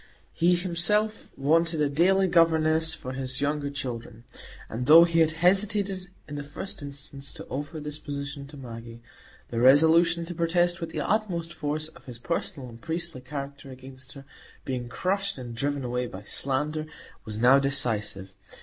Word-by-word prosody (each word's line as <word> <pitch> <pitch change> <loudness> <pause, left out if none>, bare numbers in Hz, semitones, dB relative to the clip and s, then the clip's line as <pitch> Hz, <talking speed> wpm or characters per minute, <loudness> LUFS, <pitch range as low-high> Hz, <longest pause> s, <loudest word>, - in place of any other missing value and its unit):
He 175 +2 +3
himself 190 +5 +1
wanted 160 +4 +2
a 150 - +3
daily 185 +7 +3
governess 160 -2 +3
for 130 -4 -7
his 130 0 -2
younger 145 0 -1
children; 120 -5 -6 0.4
and 125 +3 -4
though 165 +3 +10
he 165 -1 +2
had 160 -1 +5 0.2
hesitated 195 -1 +2 0.2
in 145 -1 -6
the 145 - -4
first 145 +7 -7
instance 140 0 -9
to - - -9
offer 145 +4 -4
this 150 0 -6
position 140 -1 -6
to 145 +1 -11
Maggie, 115 -2 -9 0.5
the 115 - -2
resolution 165 +6 +5
to 175 - -6
protest 175 +1 +1
with 165 - -3
the 155 -2 -3
utmost 175 -3 -1
force 155 0 -2
of 165 +1 -18
his 125 -4 -7
personal 140 0 -3
and 115 -1 -12
priestly 165 -4 -4
character 140 +1 -7
against 130 0 -11
her 140 -1 -12 0.4
being 125 -2 -3
crushed 195 +5 -1
and 120 -2 -7
driven 140 +4 -2
away 125 0 -2
by 95 -2 -9
slander, 150 +7 -1 0.4
was 105 -1 -6
now 125 +4 +6
decisive. 110 -8 0
145 Hz, 165 wpm, -27 LUFS, 130-170 Hz, 0.5 s, though